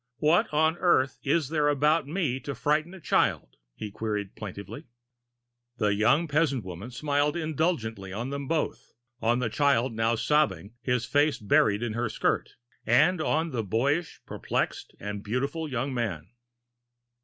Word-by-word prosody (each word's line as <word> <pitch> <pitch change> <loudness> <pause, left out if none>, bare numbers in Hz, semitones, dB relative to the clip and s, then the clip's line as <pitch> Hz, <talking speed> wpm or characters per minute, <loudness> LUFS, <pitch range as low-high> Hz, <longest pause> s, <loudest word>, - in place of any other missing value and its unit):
"What 155 +3 +3
on 160 +2 +2
earth 135 -7 +2
is 145 0 +1
there 150 -2 +1
about 145 +1 +2
me 150 -6 -1
to 140 0 -5
frighten 155 +8 0
a - - -11
child?" - - 0 0.2
he 105 -1 -6
queried 105 -2 -3
plaintively. 100 0 -8 0.9
The 105 -1 +2
young 120 +11 +3
peasant 145 -5 +1
woman 95 +5 -7
smiled 145 +4 0
indulgently 155 - -1
on 120 +7 -4
them 140 -1 -4
both, 160 0 -2 0.3
on 120 +2 +2
the 125 -2 0
child 130 0 +2
now 115 +1 +1
sobbing, 110 - +1
his 125 -2 0
face 145 0 +2
buried 105 +1 +2
in 115 -2 -2
her 120 0 -1
skirt, - - -1 0.3
and 155 +9 +4
on 160 +1 0
the 115 -3 -2
boyish, 140 - -1
perplexed, - - -3
and 105 0 -5
beautiful 140 +8 -2
young 130 +1 -2
man. 105 -10 -3
130 Hz, 150 wpm, -27 LUFS, 110-150 Hz, 0.9 s, and